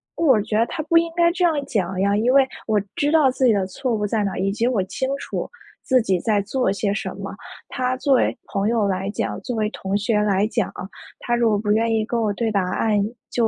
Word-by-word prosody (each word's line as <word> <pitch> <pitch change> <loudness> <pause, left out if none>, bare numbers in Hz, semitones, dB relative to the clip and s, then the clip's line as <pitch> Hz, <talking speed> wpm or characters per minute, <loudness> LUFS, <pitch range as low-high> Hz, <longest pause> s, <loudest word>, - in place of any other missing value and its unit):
我 265 -10 +3
觉 215 0 -1
得 230 - +3
他 335 - -4
不 330 +2 +3
应 335 0 +2
该 340 0 +4
这 360 +1 -2
样 335 -2 +4
讲 190 -7 -2
呀， 200 +1 +2
因 235 +4 +2
为 270 -1 +5 0.2
我 215 -1 +2 0.2
知 290 +1 +1
道 310 -4 +5
自 260 0 0
己 230 - +5
的 195 -2 0
错 250 +5 -3
误 210 -1 -1
在 215 0 0
哪 195 - -1
儿， - - -5
以 195 +1 0
及 230 +4 0
我 230 -6 +1
清 260 +8 -3
楚 - - -4 0.3
自 255 -2 +3
己 190 -4 0
在 210 +2 +1
做 245 -1 0
些 200 0 -1
什 - - -3
么。 - - -6 0.3
他 255 0 -2
作 270 0 +2
为 - - +1
朋 200 +1 -1
友 225 -3 +1
来 190 +1 -2
讲， - - -3
作 250 - -4
为 215 -1 0
同 195 +1 -2
学 210 +1 +1
来 200 -1 +2
讲， 225 -2 -1 0.5
他 240 - -1
如 235 -1 +2
果 210 - +2
不 210 0 -1
愿 225 +1 +2
意 220 -1 +1
跟 235 +1 -2
我 210 -2 +1
对 225 +1 -1
答 200 - +1 0.2
案， 215 -2 +1 0.3
就- 235 -2 +2
220 Hz, 270 characters per minute, -22 LUFS, 205-255 Hz, 0.5 s, 为